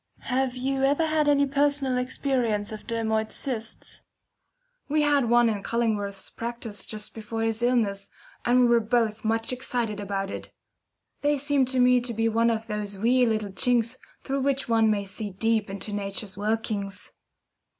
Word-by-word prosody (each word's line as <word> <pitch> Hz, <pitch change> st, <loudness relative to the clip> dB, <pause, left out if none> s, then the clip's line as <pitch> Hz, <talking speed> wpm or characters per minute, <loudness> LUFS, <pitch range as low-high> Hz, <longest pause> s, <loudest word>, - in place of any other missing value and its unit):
Have 260 Hz, -1 st, +1 dB
you 270 Hz, +1 st, -1 dB
ever 285 Hz, +4 st, +3 dB
had 310 Hz, -1 st, +1 dB
any 285 Hz, -1 st, +4 dB
personal 280 Hz, -2 st, +1 dB
experience 250 Hz, -5 st, 0 dB
of 215 Hz, -1 st, -8 dB
dermoid 220 Hz, -1 st, 0 dB
cysts? 230 Hz, -4 st, -4 dB, 0.9 s
We 300 Hz, +1 st, +3 dB
had 285 Hz, -5 st, +3 dB
one 240 Hz, 0 st, +5 dB
in 210 Hz, -3 st, -1 dB
Cullingworth's 205 Hz, -3 st, -1 dB
practice 230 Hz, -4 st, -6 dB
just 215 Hz, -1 st, -6 dB
before 225 Hz, 0 st, -4 dB
his 225 Hz, 0 st, -1 dB
illness, 220 Hz, -5 st, +1 dB, 0.3 s
and 245 Hz, +1 st, +4 dB
we -, -, +6 dB
were 235 Hz, -1 st, +5 dB
both 225 Hz, -1 st, 0 dB
much 225 Hz, +2 st, 0 dB
excited 240 Hz, -4 st, -2 dB
about 195 Hz, -1 st, -3 dB
it. -, -, -7 dB, 0.7 s
They 290 Hz, 0 st, +2 dB
seem 285 Hz, -1 st, +2 dB
to 260 Hz, 0 st, -1 dB
me 250 Hz, 0 st, +5 dB
to 240 Hz, -1 st, -4 dB
be 225 Hz, +1 st, +2 dB
one 230 Hz, +1 st, +3 dB
of 225 Hz, -1 st, -1 dB
those 210 Hz, -2 st, -4 dB
wee 245 Hz, +4 st, +3 dB
little 215 Hz, -3 st, -1 dB
chinks 235 Hz, +4 st, +1 dB, 0.3 s
through 275 Hz, 0 st, -1 dB
which 275 Hz, 0 st, 0 dB
one 225 Hz, -1 st, +4 dB
may 205 Hz, -2 st, 0 dB
see 205 Hz, +2 st, -5 dB
deep 220 Hz, +2 st, 0 dB
into 200 Hz, +1 st, -5 dB
Nature's 200 Hz, -1 st, -3 dB
workings. 205 Hz, -1 st, -2 dB
230 Hz, 165 wpm, -26 LUFS, 210-255 Hz, 0.9 s, we